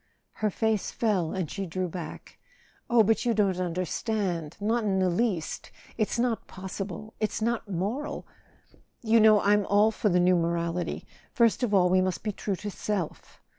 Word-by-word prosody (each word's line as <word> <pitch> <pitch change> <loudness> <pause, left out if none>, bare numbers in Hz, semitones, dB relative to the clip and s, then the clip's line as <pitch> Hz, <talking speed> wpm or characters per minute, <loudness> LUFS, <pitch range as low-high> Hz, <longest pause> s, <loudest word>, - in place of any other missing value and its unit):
Her 215 - +2
face 220 0 0
fell, 195 -8 0
and 185 -5 -3
she 195 -1 -4
drew 185 +2 -2
back. 175 0 -8 0.5
"Oh, 235 -2 +6
but 220 0 +2
you 235 -2 +1
don't 195 -3 +2
understand—not 185 +3 -1
in 195 -2 +1
the 185 -1 +2
least! 180 -4 -1 0.3
It's 215 +1 -1
not 235 -1 0
possible—it's 195 +3 -5
not 225 -1 -1
moral. 220 - -3 0.8
You 225 0 +4
know 215 -1 +6
I'm 205 +1 +3
all 210 +2 +4
for 210 -1 0
the 180 -1 +3
new 180 +1 +4
morality. 170 +1 -2 0.3
First 235 -1 +3
of 245 -4 0
all, 190 -3 +5
we 185 +1 +3
must 185 -1 -2
be 215 - -1
true 200 0 -3
to 205 +2 -6
self." 195 -5 -4
200 Hz, 165 wpm, -27 LUFS, 180-220 Hz, 0.8 s, Oh